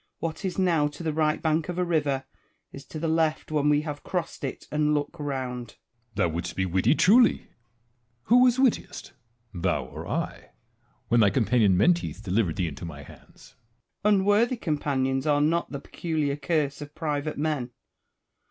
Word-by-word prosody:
What 165 Hz, +3 st, -4 dB
is 190 Hz, -2 st, -3 dB
now 170 Hz, -6 st, +2 dB
to 150 Hz, +3 st, -8 dB
the 160 Hz, -2 st, -1 dB
right 155 Hz, 0 st, +1 dB
bank 160 Hz, +1 st, 0 dB
of 175 Hz, -, -4 dB
a 180 Hz, -, +1 dB
river, 145 Hz, -6 st, 0 dB, 0.5 s
is 140 Hz, 0 st, -10 dB
to -, -, -8 dB
the 165 Hz, +2 st, -2 dB
left 160 Hz, -1 st, 0 dB
when 150 Hz, -1 st, +2 dB
we 150 Hz, 0 st, +3 dB
have 150 Hz, -2 st, -5 dB
crossed 175 Hz, -5 st, -4 dB
it 135 Hz, -, -5 dB
and 150 Hz, 0 st, +2 dB
look 145 Hz, +3 st, -2 dB
round. 130 Hz, -4 st, -4 dB
Edward. -, -, -36 dB, 0.4 s
Thou -, -, +2 dB
wouldst 85 Hz, +2 st, -4 dB
be 95 Hz, -, 0 dB
witty 95 Hz, -, +2 dB
truly! 230 Hz, +9 st, +5 dB, 0.8 s
Who 240 Hz, -, +5 dB
was 250 Hz, -1 st, +5 dB
wittiest, 245 Hz, -8 st, 0 dB, 0.4 s
thou 90 Hz, -1 st, -1 dB
or -, -, -9 dB
I, -, -, -4 dB, 0.6 s
when 120 Hz, -, +4 dB
thy 105 Hz, -3 st, +6 dB
companion 110 Hz, -4 st, +3 dB
Menteith 170 Hz, -, +1 dB
delivered 95 Hz, -3 st, 0 dB
thee 95 Hz, -4 st, -1 dB
into 80 Hz, -, -8 dB
my 75 Hz, -4 st, -7 dB
hands? -, -, -17 dB, 0.5 s
Wallace. 210 Hz, 0 st, +5 dB
Unworthy 205 Hz, +6 st, +2 dB
companions 140 Hz, -, -1 dB
are 145 Hz, -1 st, +3 dB
not 165 Hz, +3 st, +1 dB
the 140 Hz, -, -4 dB
peculiar 155 Hz, -2 st, -2 dB
curse 145 Hz, -1 st, -1 dB
of 145 Hz, 0 st, -9 dB
private 150 Hz, -1 st, -2 dB
men. 145 Hz, -4 st, -1 dB
150 Hz, 175 wpm, -26 LUFS, 130-165 Hz, 0.8 s, thy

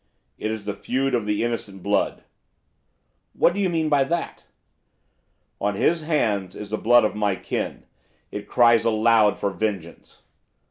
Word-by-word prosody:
'It 110 Hz, -, -2 dB
is 110 Hz, -2 st, -5 dB
the 105 Hz, -, -2 dB
feud 130 Hz, +6 st, -2 dB
of 115 Hz, -4 st, 0 dB
the 105 Hz, +1 st, 0 dB
innocent 105 Hz, -5 st, -4 dB
blood.' 100 Hz, 0 st, 0 dB, 1.1 s
'What 175 Hz, -, +3 dB
do 200 Hz, -, -4 dB
you 195 Hz, -2 st, +1 dB
mean 165 Hz, -2 st, 0 dB
by 145 Hz, -2 st, +3 dB
that?' 170 Hz, +5 st, -4 dB, 1.1 s
'On 100 Hz, 0 st, -1 dB
his 165 Hz, +10 st, +1 dB
hands 110 Hz, -, -1 dB
is 105 Hz, -1 st, -8 dB
the 110 Hz, -, -1 dB
blood 120 Hz, +1 st, +5 dB
of -, -, -1 dB
my 105 Hz, -2 st, 0 dB
kin. -, -, -4 dB, 0.5 s
It 105 Hz, 0 st, -6 dB
cries 120 Hz, -2 st, +4 dB
aloud 110 Hz, -1 st, +3 dB
for 100 Hz, -, -1 dB
vengeance. 95 Hz, -3 st, -5 dB
110 Hz, 155 wpm, -23 LUFS, 105-130 Hz, 1.1 s, blood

